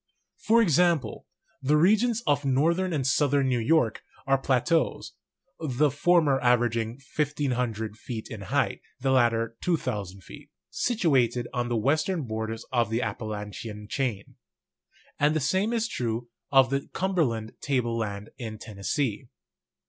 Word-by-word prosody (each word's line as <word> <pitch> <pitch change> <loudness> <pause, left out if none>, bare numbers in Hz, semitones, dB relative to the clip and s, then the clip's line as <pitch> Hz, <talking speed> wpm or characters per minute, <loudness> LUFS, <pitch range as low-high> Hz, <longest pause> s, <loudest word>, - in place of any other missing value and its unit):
For 230 +1 +4
example, 170 - +1 0.3
the 145 +3 +3
regions 220 +7 +3
of 145 0 +2
northern 165 +8 +2
and 145 -5 -1
southern 140 +1 +2
New 125 -2 +1
York 120 -2 +2 0.2
are 135 0 +2
pla 130 -1 +2
teaus 165 +5 0 0.5
(the 150 -1 +1
former 160 -4 +3
averaging 120 -1 +1 0.2
1,500 125 -7 -1
feet 110 -2 -6
in 110 -5 -8
height, 135 +9 -1 0.2
the 135 +1 0
lat 125 -3 +5
ter 115 0 -2
2,000 105 - -2
feet) - - -13 0.2
situated 130 - +1
on 120 -1 -1
the 120 - 0
western 155 - +1
borders 110 -1 -4
of 120 -4 +1
the 115 +3 0
Appalachian 105 0 -5
chain; 115 -5 -3 0.8
and 150 +2 +3
the - - +2
same 190 - +1
is 230 -1 0
true 120 - -3 0.2
of 135 -1 +5
the 140 0 -1
Cumber 190 -2 +1
land 110 -4 -3
table 125 -5 0
land 105 -2 -4
in 110 -3 -6
Tennessee. 110 +3 -3
130 Hz, 140 wpm, -27 LUFS, 115-150 Hz, 0.8 s, lat